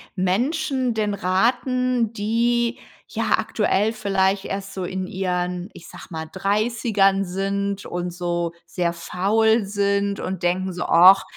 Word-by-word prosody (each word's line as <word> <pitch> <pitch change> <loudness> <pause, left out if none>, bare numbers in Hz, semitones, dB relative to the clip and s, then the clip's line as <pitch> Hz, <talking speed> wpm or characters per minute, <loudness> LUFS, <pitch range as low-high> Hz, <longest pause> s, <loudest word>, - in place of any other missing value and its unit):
Menschen 255 - 0
denn 210 -2 -1
raten, 240 +5 +1
die, 235 +2 0 0.3
ja, - - +1
aktuell 210 +4 +1
vielleicht 195 -2 +1
erst 195 0 -5
so 190 - -4
in 185 +1 -3
ihren, 180 -1 -2
ich 170 - -13
sage - - -11
mal, 160 -2 -5
30ern 200 0 +1
sind 195 +2 -2
und 175 0 -4
so 175 -1 -2
sehr 175 -2 -1
faul 215 +6 +1
sind 200 0 0
und 185 -1 -4
denken 185 +1 0
so: 180 - -3
„Och, 185 +3 +7
195 Hz, 130 wpm, -22 LUFS, 185-220 Hz, 0.3 s, Och